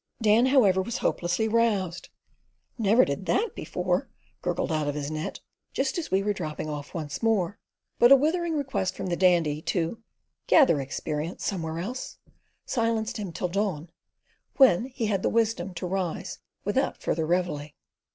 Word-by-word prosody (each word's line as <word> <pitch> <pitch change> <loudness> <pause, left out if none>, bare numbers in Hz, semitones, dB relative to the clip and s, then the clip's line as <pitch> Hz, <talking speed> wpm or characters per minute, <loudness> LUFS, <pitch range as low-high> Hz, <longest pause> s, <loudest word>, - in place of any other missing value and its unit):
Dan, 225 +2 +4
however, 210 -9 +4
was 230 +5 -3
hopelessly 180 +6 0
roused. 210 -6 0 0.7
"Never 225 +1 +4
did 140 +7 -4
that 450 +3 +1
before," - - -2 0.3
gurgled - - -1
out 155 -2 0
of 145 - -1
his 145 0 -3
net, 155 0 -4 0.3
just 270 +5 0
as 330 - -5
we 190 +1 +2
were 205 0 +1
dropping 155 -5 -5
off 145 +1 -6
once 155 -3 -4
more; 210 -4 +1 0.4
but 240 +2 +7
a - - +12
withering 325 +3 +1
request 265 -10 -1
from - - -5
the 175 -2 -1
Dandy 170 -5 +3
to 175 +7 -2 0.5
"gather 260 - +5
experience 150 +4 -4
somewhere 165 -5 -2
else," 235 +10 -5 0.5
silenced 230 -2 -1
him 200 -4 -5
till 180 +2 -3
dawn, 180 -4 -2 0.7
when 245 -6 +6
he 255 -3 -3
had 200 -3 0
the - - +1
wisdom 225 -5 0
to 165 - -4
rise 185 -2 -3 0.3
without - - 0
further 160 0 -1
reveille. 170 -4 -1
190 Hz, 160 wpm, -27 LUFS, 165-230 Hz, 0.7 s, a